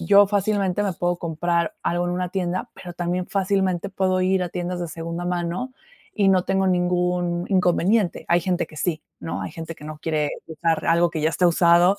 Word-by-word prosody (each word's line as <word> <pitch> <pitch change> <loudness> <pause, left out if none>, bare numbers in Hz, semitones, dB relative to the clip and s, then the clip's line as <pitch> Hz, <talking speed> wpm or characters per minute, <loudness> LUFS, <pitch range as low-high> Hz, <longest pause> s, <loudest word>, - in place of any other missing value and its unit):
yo 200 +4 +6
fácilmente 200 -1 +1
me 195 -2 0
puedo 175 +1 0
comprar 170 0 -1
algo 175 +1 0
en 175 - -1
una 180 0 -2
tienda, 185 -1 -2
pero 175 -1 -9
también 180 +1 -2
fácilmente 195 -1 0
puedo 185 -1 +1
ir 185 0 +2
a 175 - -2
tiendas 175 0 -4
de 175 - -3
segunda 165 +2 -5
mano 175 +8 -2 0.5
y 195 -1 +4
no 185 -2 +4
tengo 190 0 +1
ningún 180 -1 +1
inconveniente. 185 +1 +2
Hay 175 +1 +4
gente 180 0 0
que 155 - -15
sí, 155 0 -1 0.2
¿no? 165 - -4
Hay - - -5
gente 165 0 -7
que 150 - -14
no 155 0 -7
quiere 150 -2 -1 0.2
usar 160 0 -1
algo 170 +1 +4
que 160 -2 -3
ya 155 - +3
está 180 +2 +2
usado 175 +3 +5
175 Hz, 200 wpm, -23 LUFS, 170-185 Hz, 0.5 s, yo